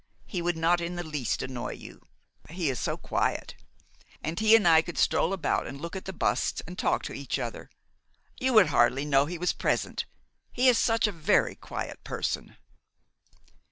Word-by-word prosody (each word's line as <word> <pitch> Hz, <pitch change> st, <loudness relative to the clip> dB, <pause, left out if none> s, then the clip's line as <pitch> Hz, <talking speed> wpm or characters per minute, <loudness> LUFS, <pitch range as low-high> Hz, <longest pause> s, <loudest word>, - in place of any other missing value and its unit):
He 180 Hz, -, -4 dB
would 175 Hz, -1 st, -1 dB
not 170 Hz, +2 st, +2 dB
in 170 Hz, +1 st, -3 dB
the 175 Hz, -, -3 dB
least 150 Hz, -7 st, -2 dB
annoy 125 Hz, -1 st, -4 dB
you, -, -, -12 dB, 0.5 s
he 165 Hz, -3 st, -1 dB
is 125 Hz, -, -4 dB
so -, -, -2 dB
quiet; -, -, -2 dB, 0.7 s
and 160 Hz, +3 st, -3 dB
he 220 Hz, +1 st, +6 dB
and 210 Hz, -5 st, +4 dB
I 160 Hz, -1 st, +7 dB
could 170 Hz, +1 st, -8 dB
stroll 170 Hz, -, +2 dB
about 195 Hz, -, 0 dB
and 140 Hz, -, -7 dB
look 170 Hz, +5 st, -6 dB
at 190 Hz, -, -6 dB
the 190 Hz, -, -4 dB
busts 125 Hz, -, 0 dB
and 180 Hz, -, -8 dB
talk -, -, 0 dB
to -, -, -5 dB
each -, -, -3 dB
other. -, -, -5 dB, 0.7 s
You 260 Hz, 0 st, +1 dB
would 215 Hz, -5 st, +7 dB
hardly 125 Hz, +4 st, +3 dB
know 140 Hz, -1 st, +3 dB
he 175 Hz, +2 st, -5 dB
was 180 Hz, +2 st, 0 dB
present, -, -, -1 dB, 0.4 s
he 255 Hz, +1 st, +2 dB
is 245 Hz, -2 st, +5 dB
such 225 Hz, 0 st, +2 dB
a 210 Hz, -, +1 dB
very 165 Hz, -5 st, +2 dB
quiet -, -, -7 dB
person. -, -, -3 dB
170 Hz, 190 wpm, -28 LUFS, 150-190 Hz, 0.7 s, I